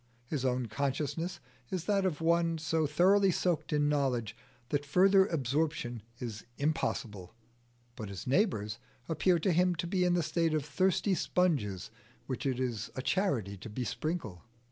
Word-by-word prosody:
His 135 +1 -3
own 125 -1 +1
consciousness 145 - -2 0.3
is 180 -3 -3
that 195 -2 +2
of 165 -3 -3
one 170 0 +2
so 160 -1 0
thoroughly 190 +6 +4
soaked 175 -2 0
in 150 -1 +2
knowledge 130 -7 0 0.3
that 145 -1 0
further 190 +6 +5
absorption 150 - -1 0.2
is 115 -4 -6
impossible, 115 - -2 0.6
but 110 -3 -6
his 100 -2 -7
neighbours 125 - +1 0.3
appear 170 +3 +2
to 175 +3 +1
him 180 +1 +3
to 170 - -3
be 180 +1 +1
in 175 -1 +3
the 175 - +1
state 165 0 +1
of 150 -2 -1
thirsty 190 +5 +1
sponges 135 - 0 0.3
which 130 +1 -3
it 130 -2 -1
is 120 -4 -2
a 130 - -4
charity 135 - 0
to 105 - -9
besprinkle. 120 - -3
150 Hz, 155 wpm, -31 LUFS, 125-175 Hz, 0.6 s, further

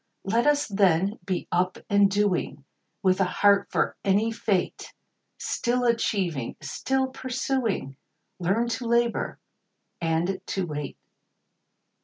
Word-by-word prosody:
Let 230 +7 +1
us, 295 0 +3
then, 195 -1 +2
be 185 -2 -2
up 180 +1 +1
and 200 -1 +4
doing, 195 -8 0 0.4
With 185 0 +3
a - - +6
heart 200 +2 +3
for - - 0
any 205 +3 +2
fate; 205 -5 -2 0.4
Still 245 +1 -1
achieving, 190 - 0
still 265 0 -1
pursuing, 255 - -2 0.4
Learn 195 +7 +1
to 235 +1 -3
labor 235 0 +1 0.6
and 170 +3 0
to 190 -2 -1
wait. 150 -3 -5
200 Hz, 115 wpm, -26 LUFS, 180-235 Hz, 0.6 s, a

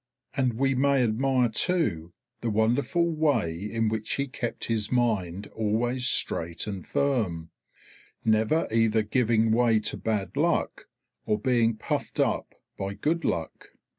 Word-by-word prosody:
And 130 -3 +1
we 135 +4 +1
may 135 0 +3
admire 125 +2 +2
too 110 - 0 0.3
the 120 - -2
wonderful 120 +10 +1
way 150 - +1
in 110 +5 -2
which 110 0 -2
he 140 - -1
kept 125 -3 -4
his 110 -2 -1
mind 105 -7 0
always 120 +4 0
straight 85 -7 +1
and 100 -3 -5
firm, 105 -13 -1 0.7
never 110 +9 +2
either 115 -1 +3
giving 115 0 +2
way 115 -1 +3
to - - -2
bad 105 -3 -2
luck - - 0 0.4
or 105 - +2
being 115 -1 +2
puffed - - -3
up - - 0 0.2
by 95 0 -3
good 165 +7 -1
luck. 80 -2 -3
115 Hz, 135 wpm, -27 LUFS, 105-130 Hz, 0.7 s, may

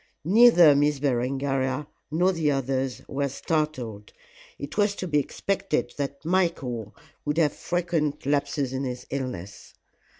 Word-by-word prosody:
Neither 185 -5 +7
Miss 145 +1 +2
Berengaria 135 +1 0 0.2
nor 175 +5 +2
the 165 -4 0
others 135 -2 -1
were 140 +1 -1
startled; 130 -9 -3 0.4
it 140 - -7
was 205 -1 +2
to 185 - -4
be 150 -3 +2
expected 155 +2 -2
that 140 +1 -4
Michael 135 - -1 0.3
would 150 +1 -2
have 155 -3 +3
frequent 170 -5 -1
lapses 145 -1 0
in 135 +1 -2
his 125 -1 -5
illness. 125 -9 -6
145 Hz, 130 wpm, -26 LUFS, 130-165 Hz, 0.4 s, Neither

